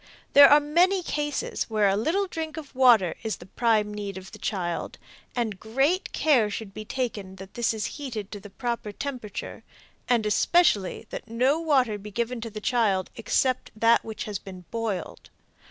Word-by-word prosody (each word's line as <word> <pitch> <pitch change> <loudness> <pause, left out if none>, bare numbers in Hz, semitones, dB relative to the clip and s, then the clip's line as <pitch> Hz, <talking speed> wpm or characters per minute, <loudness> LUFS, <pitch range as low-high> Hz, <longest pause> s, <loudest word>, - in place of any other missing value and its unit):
There 280 0 +10
are 290 - +8
many 350 +6 +2
cases 295 -3 -2
where 215 -2 +3
a 195 - +3
little 330 - +1
drink 320 -4 -5
of 300 -3 -8
water 240 -9 +5
is 220 -1 -2
the 175 - -13
prime 215 0 +1
need 200 -2 -5
of 190 0 -10
the - - -11
child, 175 -4 -3 0.4
and 220 -6 -2
great 270 - 0
care 255 -9 +3
should 205 -1 -6
be 215 - -6
taken 215 -5 -4
that 190 0 -11
this 235 -1 +1
is 220 -3 -3 0.2
heated 225 -8 -5
to 205 - -6
the 205 +1 -12
proper 235 0 -4
temperature, 250 -4 -6 0.5
and 235 -3 +3
especially 210 - +2
that - - -6
no 255 +7 +2
water 260 -10 +2
be 210 +1 -9
given 235 +3 -3
to 230 - -5
the 215 0 -7
child 210 -5 +1
except 255 +3 0
that 230 +1 +4
which 220 -1 -6
has 205 -3 -4
been 185 -2 -11
boiled. 225 -5 -4
225 Hz, 180 wpm, -26 LUFS, 205-270 Hz, 0.5 s, There